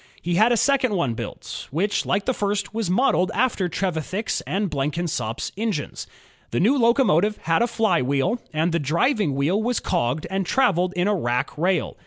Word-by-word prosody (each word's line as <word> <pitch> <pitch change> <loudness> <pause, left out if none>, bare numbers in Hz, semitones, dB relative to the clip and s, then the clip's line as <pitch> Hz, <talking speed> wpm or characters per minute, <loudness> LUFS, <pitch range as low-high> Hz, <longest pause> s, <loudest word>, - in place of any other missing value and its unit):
He 175 - -3
had 220 +7 +4
a 240 - +3
second 255 -4 +2
one 140 -10 0
built, - - -7
which 200 +8 -1
like 200 - 0
the 260 - +1
first 200 -2 -2
was 220 -4 -2
modeled 185 -2 +2
after 220 -6 +1
Trevithick's 185 +4 -2
and 200 +2 0
Blenkinsop's 145 -5 -2
engines. 210 -7 -3 0.4
The 120 - -1
new 235 +10 +4
locomotive 230 - +3
had 165 0 +2
a 235 - +3
flywheel, 185 - +1
and 160 +3 0
the 170 - +1
driving 170 - +1
wheel 160 +10 +1
was 240 +1 0
cogged 125 +6 -1
and 195 0 0
traveled 185 -5 +1
in 180 +1 0
a 210 - +2
rack 125 -9 -1
rail. 180 +4 0
185 Hz, 175 wpm, -23 LUFS, 160-220 Hz, 0.4 s, had